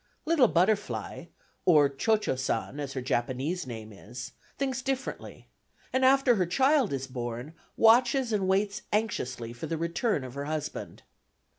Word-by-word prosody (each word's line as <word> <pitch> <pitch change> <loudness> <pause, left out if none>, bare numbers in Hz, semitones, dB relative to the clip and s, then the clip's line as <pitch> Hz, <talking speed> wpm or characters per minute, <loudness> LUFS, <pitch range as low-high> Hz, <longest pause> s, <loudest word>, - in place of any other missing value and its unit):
Little 310 -6 +5
Butterfly 205 +3 0 0.4
(or 150 -5 +6
Cio 180 +11 +1
Cio 210 - -2
San, 130 +2 -2
as 140 -2 -4
her 130 - -4
Japanese 130 +7 -1
name 110 -3 -7
is) 120 +5 -9 0.3
thinks 265 -2 -1
differently, 265 0 -4 0.5
and 260 0 +2
after 265 -2 +5
her 180 -3 +1
child 265 - +3
is 135 -1 -2
born 125 +2 -5 0.2
watches 240 +2 +4
and 195 -3 +1
waits 200 +2 +1
anxiously 125 - -2
for 120 - -6
the 165 - -2
return 170 - 0
of 130 -1 -8
her 140 +1 -4
husband. 155 0 -5
170 Hz, 150 wpm, -28 LUFS, -, 0.5 s, or